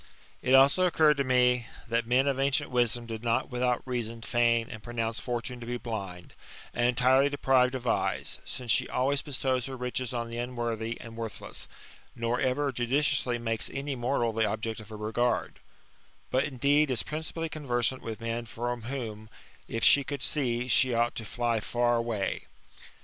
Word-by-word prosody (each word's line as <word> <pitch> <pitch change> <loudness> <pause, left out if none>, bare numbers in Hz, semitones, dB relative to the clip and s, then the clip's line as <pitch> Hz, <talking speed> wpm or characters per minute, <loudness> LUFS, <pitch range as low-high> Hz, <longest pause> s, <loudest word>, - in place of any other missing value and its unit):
It 130 +1 +4
also 140 +7 +6
occurred 155 -3 +4
to 140 - +2
me, 125 -2 +3 0.2
that 115 0 0
men 125 +3 +3
of 135 -1 0
ancient 140 +1 +1
wisdom 120 -1 +1
did 115 -1 -6
not 115 +1 0
without 125 0 0
reason 115 -3 -3
feign 115 -1 +2
and 110 - -8
pronounce 115 -1 -2
Fortune 120 0 -4
to 120 - -8
be 120 0 -2
blind, 100 -7 -6 0.4
and 120 0 +2
entirely 130 +3 +4
deprived 135 -2 +3
of 125 -1 -5
eyes; 120 - 0
since 125 -3 -3
she - - +2
always 135 +2 +1
bestows 130 -3 -1
her 135 -1 -6
riches 125 0 -3
on 115 -1 -3
the 120 - -4
unworthy 120 -2 -3
and 115 -2 -10
worthless, 115 -2 -6 0.5
nor 115 +1 -1
ever 140 +2 +1
judicially 125 0 +1
makes 115 -1 -1
any 140 +1 -3
mortal 120 -2 0
the 110 0 +1
object 110 +1 -3
of 110 -1 -11
her 110 - -7
regard: 110 +3 -1 0.7
but 130 +2 +2
indeed 145 +2 +2
is 130 - +1
principally 160 +1 -4
conversant 130 -5 -1
with 110 0 -6
men 115 +1 -2
from 120 +2 -3
whom, 110 -5 -5 0.4
if 115 - -3
she 140 - +7
could 140 -1 -4
see, 125 -4 0
she 130 -1 +3
ought 120 +1 +2
to 115 - -6
fly 120 0 0
far 120 +2 +1
away. 115 -4 -2
120 Hz, 175 wpm, -29 LUFS, 115-130 Hz, 0.7 s, she